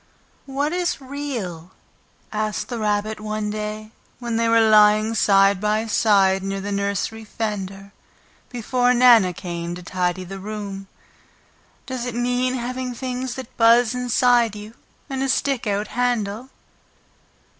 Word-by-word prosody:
"What 285 +4 -1
is 355 -1 -1
REAL?" 250 - -6 0.6
asked 215 0 -2
the 240 -2 -4
Rabbit 210 0 -1
one 215 0 -3
day, 215 0 -5 0.3
when 235 -2 -4
they 230 0 +1
were 230 0 +5
lying 215 +1 +5
side 195 -2 +4
by 215 +1 +1
side 195 -3 +3
near 195 +1 -3
the 200 +1 -5
nursery 200 +2 -2
fender, 200 -3 -5 0.6
before 245 +1 +1
Nana 240 -6 +6
came 170 -1 -5
to 180 - -10
tidy 180 +1 -2
the 195 +2 -8
room. 200 -1 -6 1.0
"Does 255 -2 -4
it 240 - -5
mean 250 +1 0
having 250 0 -4
things 255 0 -4
that 260 -3 -9
buzz 230 0 +5
inside 245 -2 +2
you 210 +1 -9 0.3
and 270 -2 -4
a 270 - 0
stick 265 -3 0
out 205 +1 -1
handle?" 245 -1 -1
215 Hz, 135 wpm, -22 LUFS, 200-245 Hz, 1.0 s, Nana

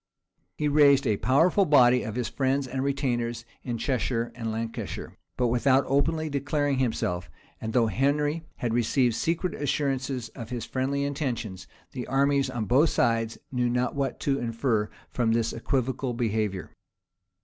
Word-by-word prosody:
He 150 - 0
raised 145 -2 +5
a 105 - +2
powerful 165 +9 +3
body 125 -6 +5
of 110 - -5
his 125 -2 -1
friends 135 0 0
and 130 +1 -3
retainers 120 -4 -1 0.2
in 120 -2 -3
Cheshire 120 -2 -1
and 115 -2 -4
Lancashire, 115 +1 -5 0.2
but 125 -2 +2
without 130 +3 +3
openly 155 +4 +1
declaring 145 -1 0
himself: 90 - -1 0.3
and 110 - -3
though 120 0 +3
Henry 145 - +1
had 120 -2 -2
received 120 +1 +2
secret 170 - -1
assurances 135 -4 -1
of 115 -3 -9
his 125 -2 -4
friendly 135 +2 -1
intentions, 125 - -3 0.2
the 125 -2 -5
armies 140 0 +2
on 120 -4 -3
both 140 - +4
sides 115 -1 +1
knew 125 -2 +1
not 125 0 0
what 140 -2 -2
to 140 -1 +1
infer 115 -2 0 0.2
from 115 -2 +1
his 115 0 0
equivocal 130 +1 -1
behavior. 105 -6 -1
130 Hz, 150 wpm, -27 LUFS, 115-140 Hz, 0.3 s, raised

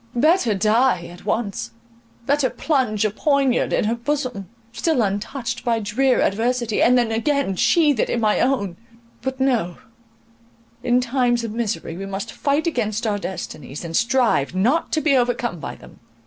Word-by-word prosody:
Better 290 - +3
die 215 -2 +2
at 175 +2 -14
once—better 230 - -3
plunge 245 -10 0
a 215 - +1
poinard 275 +1 +1
in - - +1
her 215 +2 +1
bosom, 245 -6 -3 0.2
still 245 +1 +1
untouched 230 +5 -3
by 235 -2 +1
drear 245 +5 +1
adversity, 235 +1 0
and 250 +1 +5
then 235 -2 +1
again 255 -2 0
sheathe 295 - +3
it - - +1
in 235 - 0
my 215 -2 +2
own! 200 -9 0 0.4
But, 265 +2 -4
no; 240 -10 0 1.0
in 245 +1 +2
times 245 -1 +1
of 230 - -4
misery 215 -7 -3
we 195 +1 -6
must 195 +3 -5
fight 285 +3 0
against 230 -7 -1
our 205 -2 0
destinies, 155 -6 -6
and 165 0 -5
strive 230 - +2
not 245 - +1
to 315 - +2
be 295 -3 +3
overcome 245 -6 0
by - - -6
them. - - -16
235 Hz, 160 wpm, -21 LUFS, 205-265 Hz, 1.0 s, and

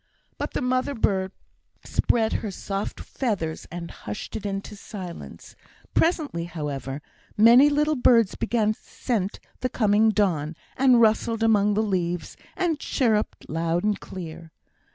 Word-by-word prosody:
But - - -3
the - - -1
mother 255 +2 0
bird 190 -4 +1 0.5
spread 225 -2 +1
her 215 - -2
soft 195 +1 -4
feathers, 195 - -3
and 170 0 -6
hushed 105 0 -7
it 210 - -3
into 195 +1 -4
silence. 190 -4 -9 0.4
Presently, 305 - +1
however, 145 -4 -5 0.3
many 240 +6 +8
little 300 +1 +2
birds 230 -5 +4
began 215 -2 +1
to - - -24
scent 210 -6 -3 0.2
the 255 - -1
coming 215 -1 +3
dawn, 170 -7 +1 0.2
and 255 -2 +5
rustled 225 0 +2
among 210 -2 +4
the 215 - +2
leaves, 175 -4 -2 0.2
and 335 -5 0
chirruped 220 -7 0
loud 165 +2 -1
and 210 -1 +1
clear. 165 -2 -8
210 Hz, 135 wpm, -25 LUFS, 175-235 Hz, 0.5 s, many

